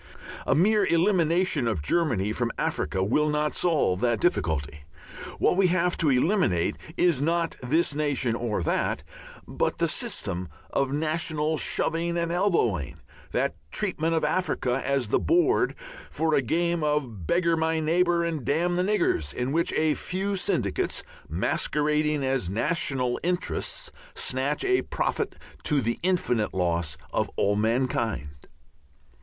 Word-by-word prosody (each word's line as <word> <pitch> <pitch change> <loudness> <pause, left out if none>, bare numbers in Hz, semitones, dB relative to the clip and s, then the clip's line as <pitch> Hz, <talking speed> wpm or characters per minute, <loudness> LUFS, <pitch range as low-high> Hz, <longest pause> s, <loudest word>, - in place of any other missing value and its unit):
A - - +3
mere 210 +7 +4
elimination 170 - +2
of 95 -10 -1
Germany 110 - +1
from 120 0 -1
Africa 95 - -1
will 150 +10 +2
not 150 0 0
solve 150 - +1
that 120 -2 +1
difficulty. 80 - 0 0.6
What - - +2
we 195 -1 +5
have 180 0 +1
to 155 - +2
eliminate 130 - +2 0.2
is 170 -6 +3
not 165 +2 0
this 150 +5 +1
nation 140 -5 0
or 115 -6 -2
that, - - 0 0.4
but - - -1
the - - +1
system 90 0 -2 0.2
of 135 -1 0
national 155 +1 0
shoving 170 +3 0
and 170 0 -1
elbowing, 120 - +1 0.3
the - - 0 0.2
treatment 165 - -1
of 160 - 0
Africa 150 -6 0
as 135 -4 0
the - - +3
board 355 +4 +2 0.3
for 160 0 0
a 140 - +4
game 170 +5 0
of 130 - -1
beggar 170 -1 +2
my 160 0 0
neighbour 170 +2 +2
and 165 -5 -2
damn 175 +6 +1
the 180 - +2
niggers, 355 - +1
in 125 +2 -2
which 170 +3 +1
a 155 -1 +2
few 195 +5 -2
syndicates, 185 - -1 0.3
masquerading 150 - 0
as 130 -9 0
national 125 - 0
interests, 180 - -2 0.2
snatch - - -1
a 380 -1 +3
profit - - -2 0.3
to 150 -2 +2
the 115 -2 -1
infinite 165 - 0
loss 85 -3 0 0.2
of - - 0
all 100 +1 +2
mankind. 115 - 0
150 Hz, 140 wpm, -26 LUFS, 120-170 Hz, 0.6 s, we